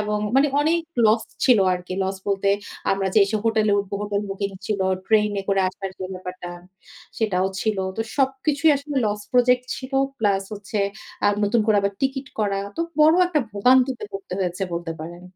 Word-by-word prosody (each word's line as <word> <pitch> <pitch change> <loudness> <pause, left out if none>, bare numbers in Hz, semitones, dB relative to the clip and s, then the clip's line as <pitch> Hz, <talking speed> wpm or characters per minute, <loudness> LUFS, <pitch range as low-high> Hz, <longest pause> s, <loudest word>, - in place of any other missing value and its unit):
এবং 210 0 -1 0.2
মানে 275 +2 +5
অনেক 320 +3 +2 0.3
লস 220 +1 +3 0.2
ছিল 250 -4 +6
আর 180 - -2
কি। - - -5
লস 190 +1 -2
বলতে 195 0 +1 0.4
আমরা 195 0 -1
যে 220 - +6
এসে 210 +2 -1
হোটেলে 220 -2 +2
উঠব, 200 -1 -11
হোটেল 205 0 -1
বুকিং 200 +1 -3 0.2
ছিল, 210 -2 -1 0.3
ট্রেনে 210 -2 +2
করে 195 -1 +3
আসার 195 0 -6
যে 185 - -4
ব্যাপারটা। 180 -1 -7 0.7
সেটাও 190 -4 +1
ছিল। 215 -3 0 0.2
তো - - -2 0.2
সবকিছুই 280 +3 +2
আসলে 285 +1 -6
লস 210 0 -2
প্রজেক্ট 250 0 +4
ছিল। 260 +1 -8 0.3
প্লাস 200 -3 +2
হচ্ছে 205 +1 -5 0.5
আ - - +5 0.2
নতুন 220 +3 +2
করে 215 -2 +4
আবার 200 0 0
টিকিট 270 0 -1
করা। 200 -2 0 0.2
তো - - -2 0.2
বড় 310 +1 +7
একটা 320 -4 +1
ভোগান্তিতে 250 +4 +3
পড়তে 195 -1 -7
হয়েছে 180 +1 -2
বলতে 170 -1 -3
পারেন। 170 +2 -8
210 Hz, 180 wpm, -23 LUFS, 195-250 Hz, 0.7 s, বড়